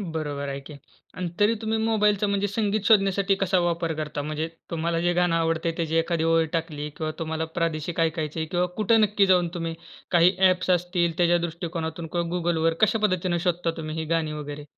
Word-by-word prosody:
बरोबर 150 -6 -4
आहे 140 0 -4
की. 150 +2 -11 0.4
आणि 180 -1 -2
तरी 210 +2 +4
तुम्ही 220 0 0
मोबाईलचा 210 -2 +2
म्हणजे 200 0 0
संगीत 210 +1 0
शोधण्यासाठी, 195 -2 +4
कसा 190 -1 +1
वापर 170 -1 0
करता? 150 -1 -4
म्हणजे 155 +2 -3 0.2
तुम्हाला 165 0 -1
जे 175 +1 +2
गाणं 175 -1 +2
आवडतंय 165 0 0
त्याची 165 -1 -1
एखादी 165 0 +1
ओळ 165 0 +3
टाकली 160 -3 -3
किंवा 155 -1 -2
तुम्हाला 160 0 -2
प्रादेशिक 165 0 -1
ऐकायचे 160 -1 -1
आहे 160 - -2
किंवा 175 +2 +1
कुठे 220 +1 +3
नक्की 210 -2 +3
जाऊन 180 -2 +3
तुम्ही 165 -1 -3 0.4
काही 175 +1 +5
ॲप्स 185 -1 +3
असतील, 175 -1 +1
त्याच्या 175 0 +4
दृष्टिकोनातून? 170 -1 -4
किंवा 170 +1 -2
Googleवर 165 -1 +1
कश्या 215 +1 +3
पद्धतीने 185 -4 +1
शोधता 175 0 0
तुम्ही 155 0 -5
ही 160 - -2
गाणी 160 -2 -1
वगैरे? 150 -1 -6
170 Hz, 185 wpm, -25 LUFS, 160-185 Hz, 0.4 s, काही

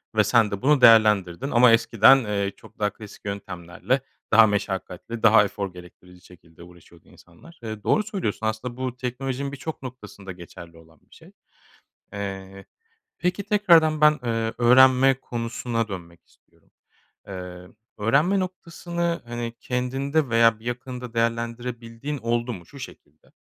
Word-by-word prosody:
ve 110 - +4
sen 110 0 +3
de 100 - -4
bunu 145 0 +3
değerlendirdin 110 -1 +5
ama 120 0 +6
eskiden, 115 +3 +5
eee, 100 -1 -1
çok - - -18
daha 105 -1 +1
klasik 105 0 -14
yöntemlerle 100 +5 -3 0.3
daha 115 0 +7
meşakkatli, 100 +2 -4
daha 110 -1 +7
efor 100 -2 -4
gerektirici 90 0 -15
şekilde 85 -1 -17
uğraşıyordu 85 -1 -18
insanlar. 125 - -18
Eee, 110 -2 -7
doğru 215 - +2
söylüyorsun, 190 - -4
aslında 115 +3 -4
bu 130 -1 -4
teknolojinin 130 +2 -4
birçok 145 +3 -7
noktasında 105 -6 -9
geçerli 85 -1 -12
olan 80 -2 -20
bir - - -18
şey. - - -17 0.8
Eee, 95 -1 -7 0.5
peki 180 +3 -1
tekrardan 170 -7 +4
ben, 150 0 +7
eee, 115 -1 -1
öğrenme 130 +2 +6
konusuna 115 -1 -3
dönmek 85 -4 -10
istiyorum. - - -32 0.6
Eee, 90 -2 -8 0.3
öğrenme 145 - +2
noktasını, 170 -1 -4
hani, 120 0 -5
kendinde 135 +4 -1
veya 115 -1 +4
bir - - -18
yakınında 125 0 -6
değerlendirebildiğin 115 +3 -3
oldu 120 0 -2
mu? 90 -6 -10
Şu 140 - -14
şekilde, 75 - -13
115 Hz, 140 wpm, -24 LUFS, 100-130 Hz, 0.8 s, daha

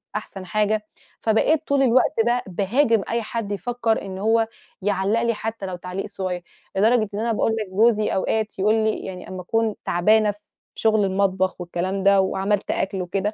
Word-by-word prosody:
أحسن 195 -3 -5
حاجة، 215 +3 0 0.4
فبقيت 285 +8 +2
طول 280 -1 +3
الوقت 255 0 +3
بقى 240 +1 +1
باهاجم 215 +4 +2
أي 235 +1 0
حد 215 -1 -4
يفكّر 230 +2 -1
إنه 190 -1 -6
هو 225 +1 +3 0.3
يعلق 205 +3 +1
لي 235 0 +1
حتى 220 -1 -5
لو 185 -1 -4
تعليق 180 +2 -5
صغير. 185 -3 -4 0.3
لدرجة 220 +1 +3
إن 205 - -3
أنا 230 +1 0
باقول 225 - +1
لِك 210 -3 -4
جوزي 215 +2 +3
أوقات 215 +2 -1
يقول 210 +3 +3
لي 220 -1 +1
يعني 185 -1 -7
أما 185 -1 -6
أكون 225 +3 0
تعبانة 210 +4 +3
في 205 - -16 0.4
شغل 220 -2 +2
المطبخ 190 -1 0
والكلام 185 +2 -2
ده، 200 0 +5
وعملت 195 +1 0
أكل 195 -1 -1
وكده، 195 +4 -2
210 Hz, 175 wpm, -23 LUFS, 190-225 Hz, 0.4 s, ده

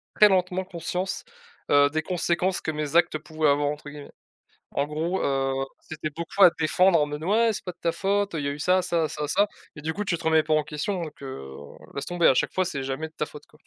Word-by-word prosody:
très 210 - +8
lentement 185 0 +1
conscience, 180 +1 -3 0.5
heu, 145 0 +6
des 155 +1 -1
conséquences 180 +2 0
que - - -4
«mes 150 +1 0
actes» 170 -2 +3
pouvaient 155 0 -1
avoir 145 0 +2
entre 150 0 -6
guillemets. 145 0 -10 0.6
En 140 - +1
gros, 160 +5 -2
heu, 135 -1 +1 0.3
c'était 155 -1 -6
beaucoup 170 +6 -2
à 180 - +10
défendre 170 +2 +4
en 150 - +2
mode: 150 +1 -6
«Ouais, 225 +4 +3
c'est 205 - -6
pas 180 - -3
de 175 - -36
ta 170 -1 +1
faute, 200 +1 0
il 150 - -2
y 140 - 0
a - - 0
eu 140 - -5
ça, 185 +4 +3
ça, 165 -3 0
ça, 150 0 -4
ça» 205 +7 +3 0.3
et - - -7
du 160 +2 -2
coup, 210 - -3
tu 170 -4 -1
te 170 - -10
remets 160 -1 +4
pas 155 - -2
en 155 - +3
question, 150 +5 -3
donc, 155 -3 -8
heu, 130 - -7 0.4
laisse 140 - -4
tomber 175 -1 +2
à 130 - +5
chaque - - +1
fois, 185 - +1
c'est 140 -7 -3
jamais 135 +4 -3
de 160 - -28
ta 150 - -1
faute 150 - -12
quoi. 150 - -23
160 Hz, 255 wpm, -26 LUFS, 150-180 Hz, 0.6 s, à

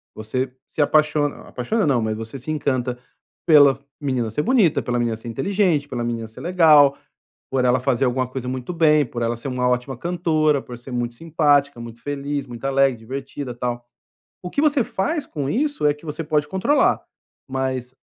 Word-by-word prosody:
você 125 +4 -3
se 150 - -2
apaixon 150 0 +3 0.2
apaixona, 170 - -1
não, 130 -4 +2
mas 110 -1 -2
você 115 +4 -7
se 145 +6 -5
encanta 130 -5 -1 0.5
pela 145 -4 +6 0.2
menina 130 -5 -1
ser 150 - -1
bonita, 225 - +3
pela 120 -1 -1
menina 115 -1 0
ser 115 +1 -9
inteligente, 165 - +1
pela 120 -4 -3
menina 115 -1 -3
ser 110 - -13
legal, 155 -6 +5 0.5
por 130 -1 +1
ela 125 0 +3
fazer 130 0 +1
alguma 125 0 0
coisa 130 -1 -5
muito 130 +5 -4
bem, 155 -3 +4
por 120 0 -5
ela 115 0 0
ser 125 +4 -7
uma 125 -1 0
ótima 125 +1 -1
cantora, 155 -4 +1
por 120 -1 -9
ser 125 +2 -11
muito 120 -1 -2
simpática, 145 -5 +2
muito 115 0 -9
feliz, 140 0 -3
muito 120 +1 -10
alegre, 135 -2 +3
divertida, 135 +2 -6
tal, 120 0 -3 0.6
o 180 - -6
que 285 - 0
você 290 -6 +3
faz 280 - -2
com 140 -3 -4
isso 285 - 0
é 145 - +3
que 150 - -18
você 150 +2 -4
pode 150 -1 +1
controlar, 270 +10 +2 0.5
mas 130 -1 -3
135 Hz, 185 wpm, -22 LUFS, 125-155 Hz, 0.6 s, pela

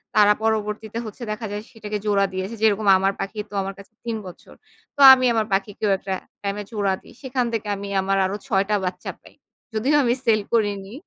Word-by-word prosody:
তারা 210 -1 +6
পরবর্তীতে 220 0 -1
হচ্ছে 220 +3 -8
দেখা 220 +1 -4
যায় 205 0 -4
সেটাকে 215 -2 -5
জোড়া 200 -1 +3
দিয়েছে। 190 +4 -4
যেরকম 215 -1 +2
আমার 195 +1 +1
পাখি 195 +2 -5
তো - - -16
আমার 195 +1 -4
কাছে 200 +2 -15
৩ 230 -1 -2
বছর। 180 - -13 0.4
তো - - -15
আমি 255 -1 +2
আমার 220 -1 +1
পাখিকেও 200 +1 0
একটা 190 0 -4 0.3
টাইম 200 0 -2
এ - - -6
জোড়া 200 -3 0
দেই। - - -16
সেখান 255 -2 -1
থেকে 215 -2 -2
আমি 200 +1 -6
আমার 195 +1 0
আরো 195 +2 -2
৬ 195 -5 +2
টা 210 - +3
বাচ্চা 180 0 -4
পাই। - - -17 0.4
যদিও 260 +7 +1
আমি 240 0 +3
সেল 215 -2 +4
করিনি। 205 -2 0
210 Hz, 205 wpm, -23 LUFS, 195-220 Hz, 0.4 s, তারা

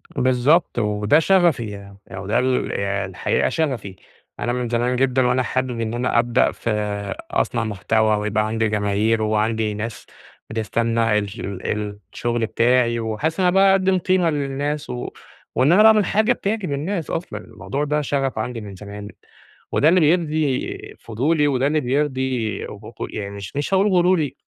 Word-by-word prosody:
بالضبط، 130 +4 +2
وده 105 +6 +2
شغفي 175 -7 +3 0.4
يع 95 - -8
و 95 - -7
ده 110 - +2
ال 130 0 0
الحقيقة 95 -2 -1
شغفي. 125 -12 -2 0.4
أنا 120 - -1
من 125 -1 -2
زمان 120 +2 0
جدًا 130 0 +2
وأنا 125 +1 +2
حابب 130 -1 -2
إن 115 0 -2
أنا 120 0 +1
أبدأ 120 0 +2
في - - -5 0.6
أصنَع 115 - 0
محتوى 110 +1 +1
ويبقى 105 +1 0
عندي 110 0 0
جماهير 105 +2 +1
وعندي 110 0 0
ناس 110 +2 -6 0.4
بتستنى 115 0 0
الش 100 +2 -6
ال 105 +2 -3 0.2
الشغل 120 -1 -1
بتاعي، 120 0 +2
وأحسّ 115 - -2
إن 185 - +3
أنا 180 - +3
باقدّم 195 -1 +4
قيمة 180 -1 +2
للناس 145 0 -2
و 125 0 -4 0.5
وإن 140 +5 +4
أنا 210 +4 +6
باعمل 220 -2 +6
حاجة 215 +6 +2
بتعجب 205 -7 -3
الناس 165 +4 -3
أصلًا. 170 - -4
الموضوع 140 +2 -5
ده 150 +1 0
شغف 135 -4 -1
عندي 115 +1 -4
من 100 -2 -9
زمان 105 +1 -9 0.6
وده 150 - +4
اللي 180 +2 +4
بيرضي 155 -4 0
فضولي، 145 +7 0
وده 135 -1 +1
اللي 155 +1 +1
بيرضي 130 -4 -1
غ - - -8 0.3
غ - - -2
يعني 100 -1 -5
مش 100 +6 -8
مش 145 +7 -2
هاقول 195 +2 +4
غروري 180 -5 +2
125 Hz, 160 wpm, -21 LUFS, 110-150 Hz, 0.6 s, أنا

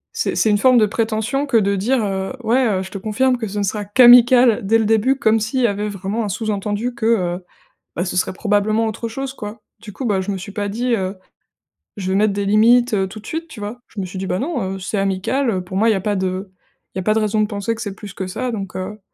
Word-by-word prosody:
c'est - - -1
c'est 220 - +2
une 205 - +2
forme 255 +2 +5
de 220 - +5
prétention 220 +5 -1
que 255 -4 +3
de 200 -2 +2
dire, 230 +5 +1
heu, 190 +2 -3
ouais, 250 +4 +2
heu: 190 -4 0
"je 190 - -10
te - - -5
confirme 250 +6 +1
que 225 - -4
ce 205 +1 -6
ne 205 - 0
sera 205 +2 -2
qu'amical 240 +1 +7
dès 225 +3 +4
le 225 - 0
début" 225 +5 +3
comme 225 -4 +3
s'il 225 +5 -1
y 240 - +4
avait 205 0 -2
vraiment 200 +3 -3
un 210 - -3
sous-entendu, 210 +3 -2
que, 225 - -4
heu, 180 -5 0 0.5
bah 175 - 0
ce 180 - -4
serait 185 - +1
probablement 210 +3 +1
autre 225 +1 -4
chose, 270 +3 -5
quoi». 210 -2 -8 0.2
Du 215 -2 -10
coup, 265 - -6
bah 200 -3 +1
je 200 - -4
me 195 - -4
suis 195 +2 -8
pas 205 0 -3
dit, 240 +4 -1
heu: 190 -1 -3 0.8
«Je 190 -1 -3
vais 190 - +1
mettre 210 0 +3
des 200 0 -2
limites, 230 +4 +4
heu, 195 -2 +1
tout 215 +3 -9
de 215 - -16
suite», 325 +1 -4
tu 300 -9 -11
vois? 210 +4 -6
Je 210 - -7
me 185 - -3
suis 185 +1 -7
dit: 190 - -3
«Bah 180 - -1
non, 245 - -2
heu, - - -7
c'est 195 +3 -3
amical, 195 +7 0
heu. 185 -4 -2
Pour 185 +1 -7
moi, 220 +4 +3
il - - +4
y - - +1
a - - -2
pas 205 +2 -1
de 190 +1 -3 0.4
il - - -4
y - - 0
a - - -4
pas 215 +3 +2
de 220 - +2
raison 215 0 0
de - - +2
penser 205 +2 -3
que 225 - -7
c'est 200 -2 -5
plus 200 -1 -10
que 190 - -4
ça, 250 +7 -3
donc 195 -4 -5
heu», 190 +3 -5
210 Hz, 285 wpm, -19 LUFS, 195-230 Hz, 0.8 s, qu'amical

